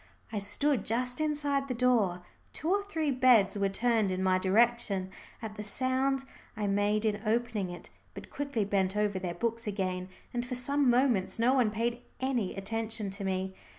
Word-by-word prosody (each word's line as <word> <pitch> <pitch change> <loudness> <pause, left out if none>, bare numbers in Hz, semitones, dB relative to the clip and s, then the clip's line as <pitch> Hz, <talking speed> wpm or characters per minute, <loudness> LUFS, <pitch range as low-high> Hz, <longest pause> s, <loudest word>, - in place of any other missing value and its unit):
I 215 - -1
stood 270 +5 +2
just 250 +5 -1
inside 290 -2 0
the 255 - -2
door. 225 -8 +2 0.3
Two 325 - -2
or 405 +1 +2
three 320 -9 -1
heads 235 -7 +6
were 200 -1 +1
turned 225 0 +1
in 185 0 -1
my 185 0 +3
direction 195 -1 +2 0.3
at 215 -1 -6
the 210 - -4
sound 260 +4 0 0.3
I 210 - -1
made 205 +2 +1
in 210 -1 0
opening 225 -3 0
it, 175 0 -9 0.2
but - - -10
quickly 280 -7 -2
bent 195 0 0
over 205 -2 +1
their 180 -2 -4
books 230 +4 -2
again, 185 -2 -2 0.2
and 240 0 -1
for 250 0 -4
some 280 +2 +2
moments 240 -6 +2
no 235 +3 +3
one 250 -5 +3
paid 235 +3 -2 0.2
any 255 -7 -1
attention 220 +1 -3
to 200 +1 -6
me. 190 0 -2
225 Hz, 180 wpm, -30 LUFS, 195-250 Hz, 0.3 s, heads